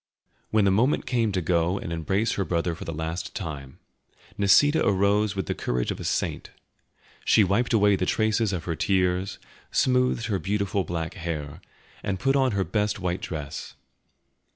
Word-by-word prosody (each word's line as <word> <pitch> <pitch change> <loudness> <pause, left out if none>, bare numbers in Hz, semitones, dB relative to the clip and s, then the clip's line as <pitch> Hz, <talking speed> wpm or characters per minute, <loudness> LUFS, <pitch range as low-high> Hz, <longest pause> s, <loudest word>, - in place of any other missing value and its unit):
When 110 -2 +3
the 95 - +4
moment 120 +9 +2
came 115 -4 +1
to 95 -2 -1
go 85 +2 +1
and 85 - -5
embrace 95 +7 0
her 100 - -1
brother 85 -1 -1
for 80 - -8
the - - -4
last 80 +2 -4
time, 70 - -6 0.6
Nisida 145 +10 +4
arose 100 +1 +2
with 95 -3 -2
the - - -1
courage - - -2
of - - -5
a - - -6
saint. - - -2 0.7
She 110 - +5
wiped 100 +6 +1
away 105 -3 +4
the 90 -1 -1
traces 110 -1 +1
of 90 -4 -3
her 85 - -2
tears, 90 +3 0 0.3
smoothed 125 -2 +2
her 100 -4 -1
beautiful 100 +2 -1
black 85 -2 -4
hair, 80 -3 -5 0.4
and 95 -2 -2
put 135 +1 +2
on 130 -4 +2
her 100 -1 +1
best 105 +4 -1
white 90 -1 -2
dress. 75 -4 -6
95 Hz, 175 wpm, -26 LUFS, 85-105 Hz, 0.7 s, She